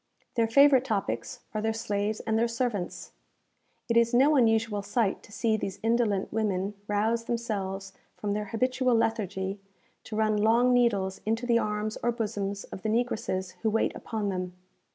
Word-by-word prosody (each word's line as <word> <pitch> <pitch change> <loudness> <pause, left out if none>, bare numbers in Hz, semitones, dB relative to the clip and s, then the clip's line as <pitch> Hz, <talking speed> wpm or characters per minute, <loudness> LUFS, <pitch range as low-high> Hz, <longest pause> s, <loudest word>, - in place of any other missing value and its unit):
Their 230 -2 +2
favourite 275 +2 +6
topics 195 - -3
are 215 - -1
their 220 0 0
slaves 210 -1 -2
and 220 -1 -1
their 230 +1 +3
servants. 230 -5 -3 0.8
It 230 - 0
is 235 +1 +4
no 280 +5 +5
unusual 225 -4 +2
sight 205 +1 0
to - - -17
see 220 +1 +1
these 195 -2 -5
indolent 225 -4 +1
women 205 -2 0
rouse 220 +3 0
themselves 195 -5 -3 0.2
from 205 -1 -2
their 210 0 -2
habitual 255 +2 +1
lethargy, 200 -3 -1 0.5
to 215 - -6
run 215 -1 +2
long 230 +4 +4
needles 200 -6 +2
into 225 +3 -1
the 235 -1 +3
arms 210 0 -2
or 240 - +2
bosoms 205 -4 -3
of - - -9
the 215 - -2
negresses 215 -5 -1
who 220 - +2
wait 220 +1 +1
upon 215 -3 -3
them. 180 -1 -4
220 Hz, 165 wpm, -28 LUFS, 200-235 Hz, 0.8 s, favourite